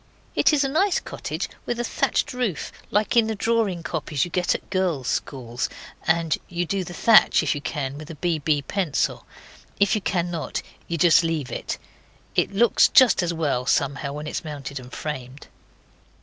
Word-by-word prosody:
It - - +4
is 295 -2 +3
a - - +1
nice 355 +7 +2
cottage, - - -5 0.2
with 240 0 -2
a - - 0
thatched 290 +3 0
roof, 245 - -2 0.2
like 210 +4 +1
in 230 -2 +5
the 220 - -2
drawing 210 -6 0
copies 155 -3 -1
you 175 - -9
get 180 +1 +1
at - - -8
girls' 175 -9 0
schools, 120 -3 -3 0.4
and 165 -1 +2
you 175 0 -1
do 195 +2 -1
the 175 - -8
thatch 225 -2 +6
if - - +1
you 145 - -5
can 140 -1 -4
with 155 +1 -10
a 165 - -7
B.B. 155 -3 0
pencil. 175 -2 -1 0.5
If 200 -1 +4
you 215 - +1
cannot, 175 -3 -2 0.2
you 170 - -2
just 170 +1 +5
leave 155 -6 -2
it. - - -4 0.6
It - - +1
looks 225 +4 +5
just 245 -8 +6
as 175 -1 0
well, 145 -6 -1
somehow, 140 +1 0
when 150 +1 -6
it 150 - -4
is - - -3
mounted 140 -3 -6
and 125 0 -12
framed. 135 -2 -6
170 Hz, 185 wpm, -24 LUFS, 145-200 Hz, 0.6 s, thatch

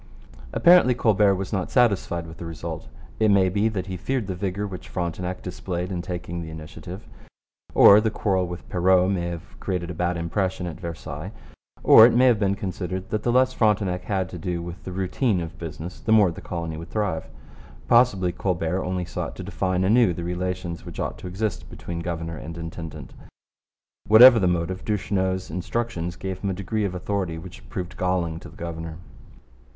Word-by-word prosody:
Apparently 170 -8 +6
Colbert 105 -4 +3
was 95 +1 -5
not 95 -3 -1
satisfied 100 -8 +2
with 80 0 -11
the 85 - -6
result. 80 -2 -6 0.3
It 110 -1 +4
may 95 -2 +4
be 105 +4 +1
that 95 -4 -3
he 95 -1 -5
feared 130 +4 -2
the 95 - -3
vigour 95 +2 -3
which 95 -3 -8
Frontenac 90 +1 -3
displayed 90 0 -4
in 90 -2 -2
taking 85 -1 -5
the 80 - -7
initiative; 80 +4 -9 0.7
or 100 +2 +9
the 110 - +1
quarrel 95 -4 0
with 90 0 -8
Perrot 90 +1 +3
may 85 -3 -1
have 85 0 -8
created 90 -3 -3
a - - -5
bad 90 +1 -1
impression 90 +2 -1
at 85 -1 -6
Versailles; 85 -1 -6 0.5
or 110 - +9
it 120 - +1
may 125 +2 +5
have 120 -4 +4
been 100 -2 +1
considered 95 -1 -4
that 110 - 0
the 120 - +1
less 130 +1 +3
Frontenac 100 -6 +1
had 95 -3 -1
to 90 - -7
do 85 +1 -2
with 85 +1 -8
the 95 - -5
routine 95 +3 0
of 85 -1 -7
business, 80 +2 -7
the 110 - -2
more 105 -5 +6
the 80 - -9
colony 85 -2 -4
would 85 +1 -8
thrive. 100 -7 -2 0.6
Possibly 115 -7 +4
Colbert 90 0 -1
only 90 -1 -2
sought - - -5
to - - -7
define 95 -1 -1
anew 105 -2 +4
the 85 - -5
relations 90 0 -3
which - - -9
ought - - -3
to - - -7
exist 95 -2 -3
between 85 -1 -6
governor 85 -1 -4
and 80 +2 -8
intendant. 80 -1 -7 0.9
Whatever 115 +2 +9
the 95 - +2
motive, 90 +1 -1
Duchesneau's 95 -4 -1
instructions 90 -1 -3
gave 95 +1 -5
him 100 - -2
a - - 0
degree 100 +3 -2
of 90 -2 -3
authority 90 -3 -2
which 85 +1 -11
proved 90 -1 -5
galling 90 -3 -1
to - - -11
the - - -16
governor. 80 -1 -6
90 Hz, 190 wpm, -24 LUFS, 85-100 Hz, 0.9 s, or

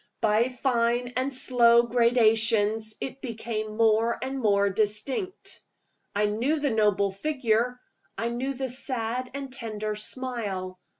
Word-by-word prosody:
By 220 +2 +2
fine 245 -1 0
and 260 +2 0
slow 240 -3 +4
gradations, 225 -2 +2
it 270 0 -6
became 220 -3 -4
more 225 +1 +3
and 265 +1 -4
more 200 -4 +3
distinct. 265 - -2 0.5
I 210 +1 +2
knew 240 +9 0
the 285 -2 0
noble 205 -2 +2
figure; 245 0 0 0.4
I 230 - -1
knew 260 +3 -3
the 265 0 -3
sad 250 -1 -2
and 275 -2 -6
tender 215 -4 -4
smile. 210 -5 -4
235 Hz, 125 wpm, -26 LUFS, 215-255 Hz, 0.5 s, slow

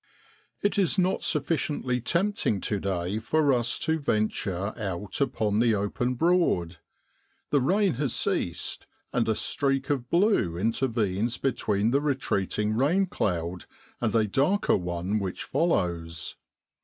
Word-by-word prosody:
It 205 0 +2
is 195 +1 +2
not 185 0 +2
sufficiently 145 -5 -1
tempting 170 - 0
to 105 - -1
day 95 +1 -2
for 145 +5 +2
us 120 -1 +1
to 160 0 +1
venture 105 - -1
out 100 +1 -4
upon 110 -6 +1
the 115 -2 +3
open 115 +5 -1
Broad. 125 - +2 0.7
The 145 - +3
rain 195 +8 +2
has 140 -5 0
ceased, - - -2 0.3
and 115 -2 +1
a 110 - +2
streak 135 +2 0
of 125 -4 -2
blue 170 - +2
intervenes 115 0 0
between 110 -4 0
the 140 +2 +2
retreat 135 -9 -1
ing 105 0 +1
rain 160 - +3
cloud 90 - -2 0.4
and 115 -2 0
a 110 -1 +4
darker 145 - +2
one 90 +3 -2
which 95 -2 -4
follows. 85 - -1
115 Hz, 135 wpm, -27 LUFS, 100-145 Hz, 0.7 s, a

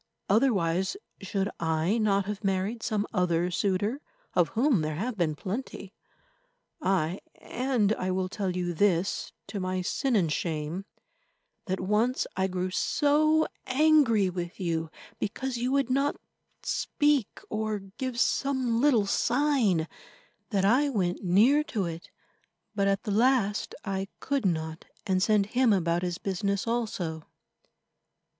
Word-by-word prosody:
Otherwise, 195 - +2 0.2
should 195 0 -1
I 165 +6 +1
not 200 -2 +2
have 210 0 -5
married 195 +4 -1
some 210 -3 -1
other 180 -2 +1
suitor, 205 - 0 0.3
of 175 -2 +3
whom 245 - +3
there 155 0 -2
have 225 +8 -3
been 165 -6 0
plenty? 200 - -6 0.9
Aye, 185 - 0 0.2
and 245 -5 0
I 185 -3 -3
will 185 0 0
tell 195 0 -3
you 175 -1 -1
this 185 +1 +1
to 205 - -5
my 185 0 -2
sin 265 +6 0
and 170 -7 +2
shame, 160 +3 -3 0.8
that 190 0 -1
once 215 +7 +1
I 190 +1 +1
grew 185 0 -2
so 310 +8 +3 0.2
angry 265 -7 +4
with 175 -1 -5
you 165 -3 -1 0.3
because 255 +4 -3
you 245 +2 -1
would 275 -2 +1
not 275 +2 +2 0.5
speak 290 -7 0
or 215 0 -2 0.2
give 255 -3 -2
some 260 -4 +1
little 255 -8 +4
sign, 240 - +2 0.6
that 195 -3 +1
I 260 +8 +4
went 185 -8 -1
near 225 +12 +4
to 210 - -2
it. 165 0 -6 0.6
But 200 -2 +1
at 195 0 +1
the 210 - -3
last 225 -2 +2
I 195 -1 -2
could 275 -7 0
not, 160 -1 -3 0.2
and 190 -3 +1
sent 210 0 +3
him 250 -2 +4
about 170 -3 +1
his 180 -1 -2
business 200 0 -1
also. 195 -9 -2
200 Hz, 135 wpm, -28 LUFS, 180-245 Hz, 0.9 s, angry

